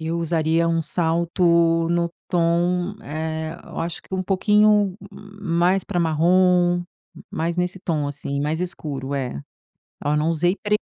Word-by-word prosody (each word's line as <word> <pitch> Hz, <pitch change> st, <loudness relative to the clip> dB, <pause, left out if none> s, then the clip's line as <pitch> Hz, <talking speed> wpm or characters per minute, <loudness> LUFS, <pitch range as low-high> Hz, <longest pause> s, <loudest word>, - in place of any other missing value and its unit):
Eu 165 Hz, +1 st, -2 dB
usaria 165 Hz, 0 st, +1 dB
um 165 Hz, 0 st, +1 dB
salto 170 Hz, 0 st, +2 dB
no 170 Hz, 0 st, 0 dB, 0.2 s
tom, 175 Hz, +2 st, +1 dB
eh, 160 Hz, +1 st, -4 dB
eu -, -, -9 dB
acho 170 Hz, 0 st, -4 dB
que -, -, -21 dB
um 185 Hz, -, -1 dB
pouquinho 210 Hz, 0 st, +3 dB, 0.2 s
mais 195 Hz, -2 st, -1 dB
para 180 Hz, -3 st, -1 dB
marrom, 175 Hz, +2 st, +3 dB, 0.5 s
mais 170 Hz, +2 st, -2 dB
nesse 180 Hz, +1 st, -1 dB
tom 155 Hz, -5 st, -1 dB
assim, 140 Hz, 0 st, -4 dB
mais 150 Hz, +3 st, -1 dB
escuro. 140 Hz, -6 st, -4 dB
É. 125 Hz, -, -3 dB, 0.6 s
Oh, 145 Hz, +1 st, +1 dB
não 155 Hz, +2 st, +1 dB
usei 175 Hz, +4 st, +1 dB
pre 210 Hz, 0 st, +2 dB
170 Hz, 145 wpm, -22 LUFS, 160-180 Hz, 0.6 s, pouquinho